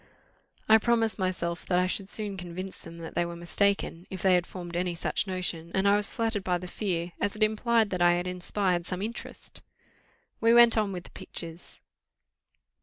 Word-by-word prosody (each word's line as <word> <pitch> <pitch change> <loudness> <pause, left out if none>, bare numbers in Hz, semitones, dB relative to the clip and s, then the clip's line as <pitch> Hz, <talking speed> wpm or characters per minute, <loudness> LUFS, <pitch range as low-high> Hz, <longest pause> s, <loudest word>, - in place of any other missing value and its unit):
I 220 0 +7
promised 225 -1 +1
myself 180 -2 -1
that 180 - +2
I 180 - +3
should 190 +1 -3
soon 210 -2 -4
convince 185 +1 -6
them 165 0 -11 0.2
they 175 - +1
were 170 0 -5
mistaken, 175 0 0
if 190 -2 -6
they 190 -1 +5
had 180 -1 +2
formed 175 -2 -7
any 175 0 0
such 170 - -1
notion, 180 -3 -2
and 190 +1 +2
I 200 - +6
was 205 -1 0
flattered 225 -3 0
by 180 -1 +1
the 180 +1 -7
fear, 175 -3 -2
as 205 - 0
it 215 - +2
implied 220 0 +2
that 180 -2 -1
I 175 0 +6
had 175 +1 -1
inspired 180 -1 -1
some 185 +1 -2
interest. 230 +3 -6 0.8
We 230 +1 +5
went 235 -1 +8
on 210 -3 +1
with 180 -2 -5
the - - -14
pictures. 165 0 -7
185 Hz, 190 wpm, -28 LUFS, 175-210 Hz, 0.8 s, went